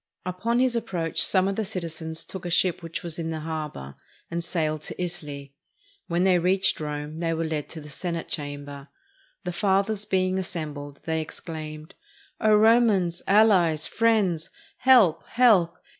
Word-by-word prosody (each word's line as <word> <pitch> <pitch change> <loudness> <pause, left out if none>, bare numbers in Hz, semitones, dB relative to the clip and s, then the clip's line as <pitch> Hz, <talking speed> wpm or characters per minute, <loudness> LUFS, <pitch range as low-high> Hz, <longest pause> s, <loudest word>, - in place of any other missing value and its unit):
Upon 200 +6 -1
his 250 -1 +2
approach 180 -8 -1
some 190 -1 +4
of 195 - -1
the 220 - -1
citizens 165 -5 -4
took 190 - -6
a 175 - -4
ship 180 0 +2
which 165 -1 -6
was 170 -1 -2
in 165 -1 -3
the 160 -1 -4
harbor, 150 - -5 0.4
and 170 0 -2
sailed 155 -3 -1
to - - -8
Italy. 145 -6 -5 0.5
When 175 +1 +1
they 185 -2 +4
reached 185 +2 +2
Rome, 150 0 -5
they 165 -1 -1
were 165 0 -1
led 155 -2 -3
to 160 - -8
the 150 - -11
Senate 170 +2 -4
Chamber. 145 -1 -6 0.6
The 180 - -3
fathers 200 +2 +1
being 185 -1 +1
assembled, 150 -6 -5
they 160 -1 0
exclaimed, 155 0 -7 0.5
"O 215 - +3
Ro 225 +3 +6
mans, 185 -7 +1
allies, 190 -7 +4
friends, 195 -7 +1 0.3
help! 245 -11 +5
help! 210 -9 +4
170 Hz, 160 wpm, -25 LUFS, 155-195 Hz, 0.6 s, Ro